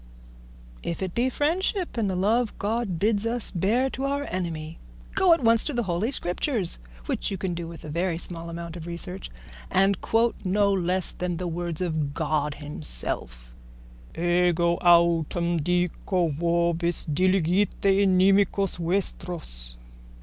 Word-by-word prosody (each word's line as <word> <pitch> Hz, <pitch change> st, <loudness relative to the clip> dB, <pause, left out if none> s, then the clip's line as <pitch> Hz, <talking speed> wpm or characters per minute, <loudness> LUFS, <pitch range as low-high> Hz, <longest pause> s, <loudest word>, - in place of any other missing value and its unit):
_ -, -, -22 dB, 0.8 s
"If 170 Hz, +3 st, -4 dB
it 185 Hz, -2 st, -4 dB
be 245 Hz, +2 st, +1 dB
friendship 350 Hz, -, -1 dB
and 220 Hz, -4 st, 0 dB
the 185 Hz, -, -1 dB
love 215 Hz, +5 st, +1 dB
God 210 Hz, -3 st, -1 dB
bids 205 Hz, +3 st, +1 dB
us 230 Hz, 0 st, 0 dB
bear 215 Hz, +9 st, +1 dB
to 270 Hz, -, -3 dB
our 280 Hz, +1 st, -1 dB
enemy, 165 Hz, -3 st, -4 dB, 0.3 s
go 380 Hz, -2 st, +4 dB
at 330 Hz, -5 st, +4 dB
once 230 Hz, -1 st, +5 dB
to 295 Hz, -, -2 dB
the 240 Hz, -, +1 dB
Holy 190 Hz, +4 st, -1 dB
Scriptures, 195 Hz, -, +2 dB, 0.3 s
which -, -, -2 dB
you 195 Hz, -, -3 dB
can 185 Hz, -1 st, -2 dB
do 170 Hz, -1 st, -5 dB
with 165 Hz, -2 st, -10 dB
a -, -, -7 dB
very 170 Hz, +2 st, -1 dB
small 170 Hz, -1 st, -6 dB
amount 170 Hz, 0 st, -6 dB
of 170 Hz, -1 st, -8 dB
research, 180 Hz, +2 st, -5 dB, 0.4 s
and 195 Hz, 0 st, +2 dB
quote 230 Hz, +1 st, +2 dB
no 200 Hz, +1 st, +2 dB
less 185 Hz, -1 st, 0 dB
than 180 Hz, -1 st, -3 dB
the 180 Hz, -, -4 dB
words 170 Hz, 0 st, -3 dB
of 155 Hz, -5 st, -2 dB
God 150 Hz, -2 st, -1 dB
himself: -, -, -5 dB, 0.6 s
Ego 175 Hz, 0 st, +2 dB
autem 170 Hz, 0 st, +3 dB
dico 180 Hz, +1 st, 0 dB
vobis: 170 Hz, +2 st, +1 dB
diligite 185 Hz, +4 st, +2 dB
inimicos 195 Hz, 0 st, +3 dB
vestros. 170 Hz, -, -2 dB
180 Hz, 150 wpm, -26 LUFS, 170-200 Hz, 0.8 s, once